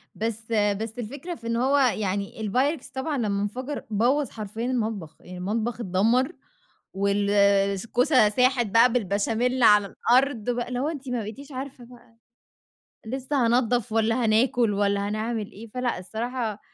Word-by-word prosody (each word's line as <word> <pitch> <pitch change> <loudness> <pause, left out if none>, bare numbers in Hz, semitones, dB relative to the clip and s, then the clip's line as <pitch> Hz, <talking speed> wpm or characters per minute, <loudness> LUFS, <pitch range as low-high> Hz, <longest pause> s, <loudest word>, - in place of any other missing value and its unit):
بس 225 +1 -4
بس 215 +2 0
الفكرة 285 +10 -6
في 230 -1 -10
إن 230 - 0
هو 265 +4 +2
يعني 205 -6 0 0.2
الPyrex 275 +5 0
طبعًا 280 +2 -2
لمّا 200 -4 -1
انفجر 255 +8 -4
بوّظ 245 +6 +1
حرفيًا 220 +1 -6
المطبخ، 220 -10 -2
يعني 180 0 -10
المطبخ 220 +6 -2
اتدمّر 230 - +2 0.6
والكوسة 200 +5 +3
ساحت 250 +2 +2
بقى 230 +4 +5
بالبشاميل 230 +3 0
على 210 -2 +6
الأرض 245 +1 +1
بقى، 240 0 -1
اللي 245 0 -3
هو 275 - 0
أنتِ 280 -5 -6
ما 250 - -1
بقيتيش 250 +8 -8
عارفة 260 -1 -7
بقى، 240 -1 -18 0.9
لسه 265 +2 -1
هانضّف 240 -1 +1
والَّا 225 +2 +1
هناكل، 225 0 +2
والَّا 200 0 0
هنعمل 215 0 -3
إيه، 225 +3 -11
فلأ 250 -6 -1
الصراحة 225 +2 -4
230 Hz, 145 wpm, -25 LUFS, 205-250 Hz, 0.9 s, على